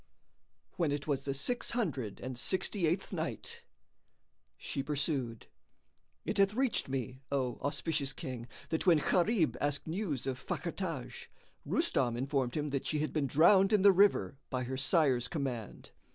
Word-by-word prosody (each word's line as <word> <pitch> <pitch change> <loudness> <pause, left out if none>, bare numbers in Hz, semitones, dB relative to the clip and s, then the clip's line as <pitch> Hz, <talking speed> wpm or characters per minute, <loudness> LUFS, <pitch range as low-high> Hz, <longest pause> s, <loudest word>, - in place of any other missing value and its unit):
When 165 -5 +1
it 145 0 -2
was 140 -3 -1
the 135 - -1
Six 245 - 0
Hundred 135 - -2
and 130 0 -5
Sixty 185 - 0
eighth 170 +5 -1
Night, 465 0 -4 1.0
She 140 - -3
pursued, 135 -5 -1 0.8
It - - -2
hath 195 +1 +4
reached 255 - +1
me, 130 -1 -4
O 130 -4 -1
auspicious 145 -1 -1
King, 125 -2 -6 0.2
that 160 +3 -1
when 170 -3 +7
Gharib 180 +3 +2
asked 145 0 -1
news 160 - -2
of 130 -1 -3
Fakhr 170 -1 -3
Taj, 165 -9 -5 0.4
Rustam 120 -3 +1
informed 135 -1 -1
him 150 -1 -2
that 140 -1 -2
she 155 - 0
had 150 +1 -2
been 150 -3 +1
drowned 190 - +5
in 210 -3 +4
the 200 - +9
river 180 - +3
by 130 -1 -1
her 130 +2 -4
sire's 135 -3 +2
command. 130 -9 -4
145 Hz, 155 wpm, -32 LUFS, 130-175 Hz, 1.0 s, the